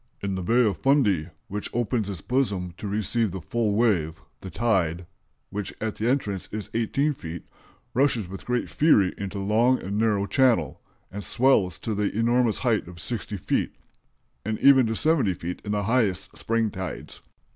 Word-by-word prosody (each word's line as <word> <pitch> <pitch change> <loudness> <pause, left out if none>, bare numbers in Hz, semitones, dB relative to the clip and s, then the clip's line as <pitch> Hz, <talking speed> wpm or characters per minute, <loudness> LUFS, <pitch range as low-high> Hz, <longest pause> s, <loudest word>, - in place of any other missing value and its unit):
In 100 -1 -3
the 95 - -3
Bay 120 +7 +3
of 105 - 0
Fundy, 105 - +2 0.2
which 105 +1 -4
opens 115 -3 0
its 95 -5 -5
bosom 100 -9 -1
to 105 - -6
receive 110 +2 0
the 95 +1 -5
full 110 +3 -1
wave, 90 -8 +1 0.2
the 95 - -8
tide, 90 -7 0 0.5
which 100 0 -4
at 110 -1 -3
the 110 - -1
entrance 105 -8 -1
is 105 -1 -6
18 135 +6 +1
feet, 85 - -8 0.5
rushes 125 -6 +2
with 95 +1 -8
great 125 0 -1
fury 105 - +3
into 100 0 -5
that 100 - -3
long 115 +5 +3
and 100 +2 -3
narrow 105 -3 +2
channel, 115 - +2 0.3
and 100 +1 -6
swells 110 -10 +2
to 110 - -3
the 105 0 0
enormous 120 0 +2
height 115 -7 0
of 85 -1 -11
60 105 +1 -4
feet, - - -1 0.7
and 110 +1 -2
even 135 -3 +6
to 115 - -1
70 140 - +2
feet 85 +2 -6
in 105 - -4
the 105 -1 0
highest 100 -5 0
spring 115 -1 0
tides. 95 -1 -7
105 Hz, 180 wpm, -25 LUFS, 95-120 Hz, 0.7 s, even